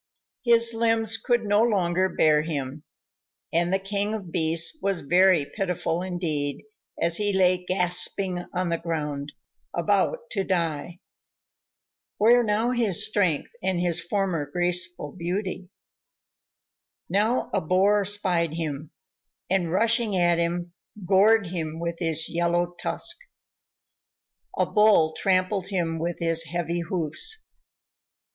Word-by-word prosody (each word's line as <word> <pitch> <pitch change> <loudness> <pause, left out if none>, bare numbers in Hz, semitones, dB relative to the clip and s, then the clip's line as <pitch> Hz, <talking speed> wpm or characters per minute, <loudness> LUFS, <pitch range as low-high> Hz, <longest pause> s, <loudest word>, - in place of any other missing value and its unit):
His 235 -1 +4
limbs 225 -1 +1
could 240 0 0
no 205 0 +2
longer 190 -5 +1
bear 155 -3 +3
him, 145 -2 -5 0.7
and 170 +2 +1
the 190 - +3
King 200 +2 -1
of 190 -6 -8
Beasts 170 - +2
was 195 -3 -1
very 175 +1 +3
pitiful 180 -1 -3
indeed 165 -6 -2 0.4
as 170 0 +2
he 205 -1 0
lay 185 -2 +2
gasping 180 0 0
on 180 -1 -2
the 170 -1 -1
ground, 150 -4 -4 0.4
about - - 0
to 195 - -1
die. 170 -1 -3 1.2
Where 235 +3 +5
now 220 +2 0
his 230 -8 +3
strength 185 -8 0
and 185 -2 -1
his 175 -1 +1
former 175 -5 -2
graceful 175 -1 0
beauty? 185 +1 -4 1.4
Now 215 +5 0
a - - +1
Boar 195 +5 +2
spied 180 -5 0
him, 155 -2 -4 0.6
and 180 -4 0
rushing 225 +1 +2
at 175 -1 +3
him, 175 +1 -2 0.3
gored 200 +3 +4
him 165 -2 -5
with 170 0 -4
his 160 -2 0
yellow 175 +1 0
tusk. 340 0 -1 1.4
A - - +2
Bull 210 -7 +3
trampled 185 +1 0
him 170 -4 -2
with 170 +1 -3
his 165 -1 +1
heavy 170 +2 -3
hoofs. 170 - -1
180 Hz, 125 wpm, -25 LUFS, 165-200 Hz, 1.4 s, Where